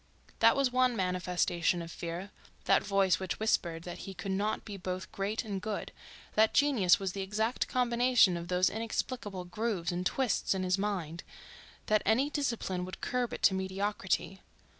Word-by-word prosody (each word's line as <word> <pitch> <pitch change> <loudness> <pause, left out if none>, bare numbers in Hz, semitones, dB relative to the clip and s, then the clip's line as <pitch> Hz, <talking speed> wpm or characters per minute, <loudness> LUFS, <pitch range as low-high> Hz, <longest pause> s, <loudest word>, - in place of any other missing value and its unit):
That - - +6
was 275 -2 +2
one 255 -1 +3
manifestation 180 -2 0
of 165 - -9
fear, 175 +5 -6 0.3
that - - +4
voice 195 -2 +2
which 190 -1 -4
whispered 170 -6 0
that 175 0 -7
he 195 - -8
could 195 0 -4
not 205 +3 -1
be 205 - -6
both 185 -1 -5
great 205 +4 -2
and 200 -3 -4
good, 215 0 -4 0.4
that 220 0 +3
genius 255 -11 +4
was 195 -2 -2
the 195 - -4
exact 215 +5 -1
combination 245 -5 +3
of 170 0 -5
those 180 +1 +2
inexplicable 220 -3 -3
grooves 190 -2 -2
and 175 +1 -2
twists 240 0 0
in 190 - -1
his 185 +1 +1
mind, 180 -5 -2 0.6
that 215 -1 +3
any 255 +8 +2
discipline 235 -11 -2
would 185 +1 -7
curb 250 -1 -1
it - - -7
to 190 - +6
mediocrity. 190 0 -2
195 Hz, 170 wpm, -31 LUFS, 180-225 Hz, 0.6 s, That